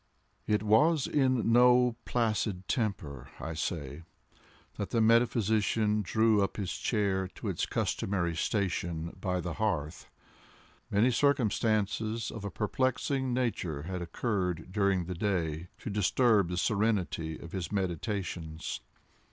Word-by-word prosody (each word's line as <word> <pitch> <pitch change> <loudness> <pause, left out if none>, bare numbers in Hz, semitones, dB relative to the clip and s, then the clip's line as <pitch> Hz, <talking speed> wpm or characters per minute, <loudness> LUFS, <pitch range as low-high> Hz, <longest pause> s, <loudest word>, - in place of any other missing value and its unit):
It 105 0 +1
was 130 +8 +4
in 130 -5 +2
no 125 0 +5
placid 105 -5 -1
temper, 80 - -2
I 80 - -4
say, 75 -2 -4 0.8
that 100 - -3
the 115 - +1
metaphysician 110 -2 +3
drew 110 +2 +3
up 100 - -1
his 95 -4 -2
chair 100 -4 0
to - - -4
its - - -1
customary 85 -4 -1
station 85 -4 -2
by 90 -1 0
the 85 -1 -4
hearth. 80 -7 -2 0.8
Many 110 +5 +3
circumstances 110 -4 +1
of 110 - -7
a 100 - -3
perplexing 130 +5 -1
nature 110 - -1
had 90 +2 -4
occurred 90 -1 -2
during 95 -3 +1
the 90 - -4
day, 85 -4 -1
to - - -6
disturb 105 0 +3
the 90 - -3
serenity 100 -6 0
of 85 - -10
his 90 -3 -4
meditations. 90 -3 -3
100 Hz, 125 wpm, -30 LUFS, 90-115 Hz, 0.8 s, no